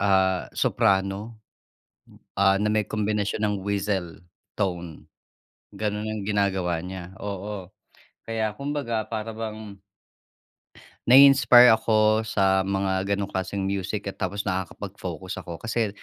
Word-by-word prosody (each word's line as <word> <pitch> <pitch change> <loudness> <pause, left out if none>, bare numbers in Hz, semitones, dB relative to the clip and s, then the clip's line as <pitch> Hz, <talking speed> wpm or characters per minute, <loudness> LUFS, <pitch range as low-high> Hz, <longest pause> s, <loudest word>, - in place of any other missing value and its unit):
ah, 95 -2 +2
soprano, 95 +3 +1 1.0
ah, 95 0 +4
na 105 +1 0
may 110 -1 +1
kombinasyon 105 -1 -1
ng 105 -1 0
whistle 100 -4 -2 0.4
tone. 90 -5 -3 0.7
Ganun 105 0 -3
ang 110 -1 -3
ginagawa 95 -5 0
niya, 95 0 -8
oo. 100 -1 -5 0.6
Kaya 110 -2 -1
kumbaga 120 -5 -3
para 110 0 -4
bang 110 -2 -6 1.4
nai-inspire 125 -2 +8
ako 110 0 +3
sa 95 -3 +2
mga 95 -1 0
gano'ng 100 0 -1
klaseng 95 +1 -3
music 100 +2 -3
at 100 - -6
tapos 100 +2 -2
nakakapag-focus 95 -2 -5
ako 85 -2 -8
kasi 115 -1 -1
100 Hz, 110 wpm, -25 LUFS, 95-110 Hz, 1.4 s, nai-inspire